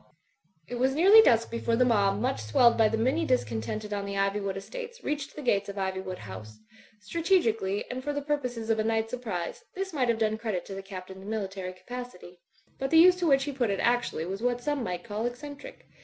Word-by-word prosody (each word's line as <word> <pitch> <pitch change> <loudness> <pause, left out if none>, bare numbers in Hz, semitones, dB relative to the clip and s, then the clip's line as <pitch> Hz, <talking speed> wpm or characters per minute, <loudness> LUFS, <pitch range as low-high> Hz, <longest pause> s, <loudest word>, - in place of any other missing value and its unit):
It 245 - -5
was 265 +2 +2
nearly 395 +8 +8
dusk 230 - +3
before 230 0 0
the 250 +2 +4
mob, 200 -4 +2
much 245 - -1
swelled 230 - +4
by 220 -1 +4
the 225 - -1
many 260 +9 +1
discontented 210 - -1
on 200 -1 -2
the 200 0 -4
Iv)rwood 195 0 0
estates, 470 - -8
reached 290 -1 -3
the 300 - -7
gates 205 -5 +1
of 200 - -6
Ivywood 190 -1 -3
House. 110 - -9 0.4
Strategically, 225 - +1
and 255 +1 -5
for 290 - -2
the 285 -1 -3
purposes 250 -6 -2
of 220 - +1
a - - +2
night 225 0 0
surprise, 215 - -4
this 385 -1 -4
might 255 -5 +1
have 230 - +2
done 220 -1 0
credit 215 -6 -3
to - - -8
the 195 - -5
Captain's 190 0 -9
military 195 -3 -4
capacity. 185 -4 -9 0.4
But 270 - -1
the 325 - +4
use 360 +2 +8
to 355 -2 0
which 275 -2 +4
he 290 - -3
put 255 -5 0
it 195 - -1
actually 240 -9 +1
was 195 +4 -5
what 245 0 0
some 290 -2 -1
might 180 -5 -4
call 220 +1 -2
eccentric. 285 - -9
225 Hz, 215 wpm, -28 LUFS, 195-270 Hz, 0.4 s, nearly